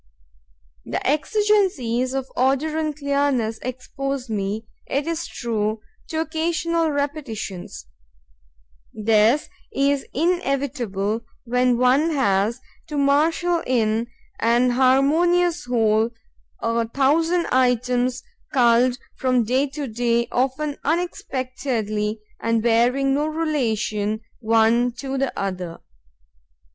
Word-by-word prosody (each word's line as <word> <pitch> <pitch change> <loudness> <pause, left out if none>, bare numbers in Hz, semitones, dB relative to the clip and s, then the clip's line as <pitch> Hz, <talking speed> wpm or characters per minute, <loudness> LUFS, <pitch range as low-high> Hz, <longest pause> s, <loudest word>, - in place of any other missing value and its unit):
The - - -4
exigencies 300 - +1
of 265 -1 -2
order 275 +5 +1
and 305 -2 -2
clearness 280 -6 0
expose 260 0 -4
me, 210 +1 -2 0.2
it 280 +2 -1
is 335 0 -3
true, 215 -2 -2 0.3
to 315 - -3
occasional 325 +1 0
repetitions. 275 - -4 1.1
This 220 +5 +3 0.2
is 280 0 +1
inevitable 270 - -1 0.2
when 250 0 +2
one 255 +6 +3
has 210 0 +1 0.3
to 300 - -4
marshal 325 +5 +2
in 230 -2 +1 0.3
an 240 +2 +3
harmonious 315 +7 +3
whole 225 -2 +2 0.5
a 230 0 0
thousand 325 +8 +2
items 250 0 +1 0.3
culled 245 -1 +4 0.2
from 255 -2 +2
day 260 +5 +1
to 285 +1 -5
day, 235 +1 0
often 275 +4 -1
unexpectedly, 255 -9 -2 0.2
and 230 -1 0
bearing 245 +4 +3
no 295 +2 +1
relation 230 -9 -1 0.2
one 230 +2 +3
to 265 +2 -4
the 275 -1 0
other. 185 -4 -4
255 Hz, 100 wpm, -22 LUFS, 230-290 Hz, 1.1 s, culled